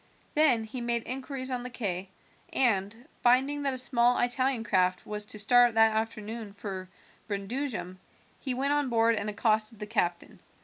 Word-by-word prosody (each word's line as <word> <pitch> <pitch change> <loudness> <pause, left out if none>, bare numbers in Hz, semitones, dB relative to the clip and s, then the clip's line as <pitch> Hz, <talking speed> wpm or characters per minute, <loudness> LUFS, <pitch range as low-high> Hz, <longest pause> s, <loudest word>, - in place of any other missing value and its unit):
Then 285 -7 +4
he 230 +3 -6
made 235 -1 0
inquiries 260 0 -4
on 250 -1 -2
the 250 - -6
quay, 195 -6 -2 0.4
and, 225 +1 +1
finding 265 +4 +3
that 275 -2 0
a - - -4
small 245 -1 +3
Italian 250 0 +1
craft 185 -4 +1
was 210 0 -4
to 215 - -5
start 240 +2 +4
that 225 -1 +5
afternoon 220 -1 -4
for 190 -3 -6 0.4
Brundusium, 205 -2 -4 0.4
he 260 -3 0
went 275 +3 +1
on 290 -2 0
board 230 -1 +3
and 215 -1 -2
accosted 215 +1 0
the 210 - -6
captain. 175 -5 -2
230 Hz, 165 wpm, -28 LUFS, 210-255 Hz, 0.4 s, that